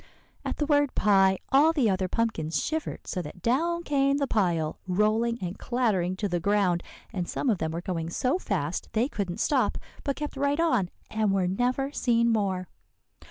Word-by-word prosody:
"At - - -3
the 295 - 0
word 290 -2 +2
'pie,' 195 -2 +4
all 295 +4 +5
the 275 -8 +2
other 190 -2 +1
pumpkins 165 -9 -1
shivered 315 0 -3
so 180 - -3
that 170 +2 -10
down 335 +8 +1
came 275 -2 +2
the 285 - +1
pile 175 - 0
rolling 215 +5 +2
and 180 +1 -4
clattering 210 -8 0
to 205 +2 -2
the 175 -2 -1
ground; 185 -2 +2 0.3
and 180 -3 -3
some 265 - 0
of 200 - -1
them 160 - -1
were 165 +2 -4
going 165 -3 -3
so 255 - 0
fast 175 - -2
they 225 +3 +2
couldn't 195 -9 -3
stop, 275 -3 +1 0.3
but 280 -2 -1
kept 295 -1 -5
right 285 +2 +1
on 250 - +2 0.2
and 215 -2 +1
were 190 -2 +1
never 250 +8 0
seen 235 -4 +2
more. 190 -4 0
215 Hz, 185 wpm, -27 LUFS, 180-270 Hz, 0.3 s, all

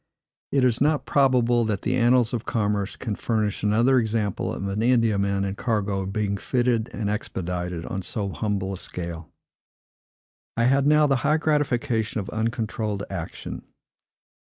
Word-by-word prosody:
It 135 -2 +3
is 120 -1 +1
not 150 +1 +2
probable 125 -4 +3
that 105 -4 -2
the 125 - +1
annals 125 -1 +3
of 120 -2 -2
commerce 105 -4 -1
can 110 - -4
furnish 105 -1 -1
another 115 +5 +4
example 110 -3 -1
of 100 - -4
an 100 +2 -2
Indiaman 105 -5 +2
and 95 0 -3
cargo 100 -4 -1
being 100 0 -1
fitted 120 0 0
and 105 -1 -3
expedited 90 -4 -3
on 95 - -3
so 100 +2 -3
humble 100 -1 -2
a 95 - -7
scale. 85 -2 -7 1.3
I 115 - +2
had 135 +3 +3
now 150 0 +5
the 135 -2 +3
high 150 +5 +2
gratification 135 -8 0
of 100 - -5
uncontrolled 110 -2 -2
action. - - -6
110 Hz, 150 wpm, -25 LUFS, 100-125 Hz, 1.3 s, now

